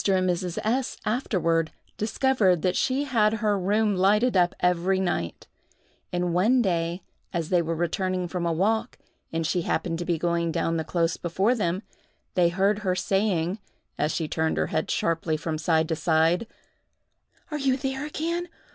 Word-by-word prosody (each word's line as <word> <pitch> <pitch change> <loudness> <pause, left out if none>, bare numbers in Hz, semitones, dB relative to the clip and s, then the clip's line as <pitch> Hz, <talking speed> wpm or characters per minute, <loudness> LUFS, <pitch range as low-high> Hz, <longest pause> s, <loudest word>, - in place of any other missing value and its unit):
and 185 -1 +2
Mrs. 180 -1 -1
S—— 255 +4 0
afterward 170 -9 +1 0.3
discovered 215 - +2
that 185 -1 +1
she 270 +2 +1
had 225 -6 +2
her 215 -2 +1
room 205 +2 +2
lighted 210 +5 +3
up 180 -1 +3
every 180 +2 +2
night; 175 - -2 0.7
and 175 -1 -1
one 215 +9 +4
day, 175 -4 0 0.3
as 165 -2 -2
they 180 -2 +3
were 165 0 -2
returning 180 +2 -1
from 175 0 -3
a 170 - +1
walk, 220 +8 0 0.3
and 165 0 -1
she 175 +2 +1
happened 165 0 -1
to 175 - -3
be 170 -1 0
going 170 0 0
down 165 0 0
the 160 - -1
close 165 0 0
before 190 +7 +1
them, 190 -4 -1 0.5
they 175 -2 +4
heard 195 +4 +1
her 185 -3 0
saying, 185 0 0 0.4
as 150 +1 0
she 160 0 -2
turned 160 +1 -1
her - - +1
head 155 - 0
sharply 165 -1 0
from 155 0 -3
side 160 0 +2
to 160 - -1
side, 165 +5 +2 1.0
"Are 300 - -2
you 265 -2 +2
there 265 0 -3
again? 335 +4 -2
180 Hz, 170 wpm, -26 LUFS, 165-215 Hz, 1.0 s, one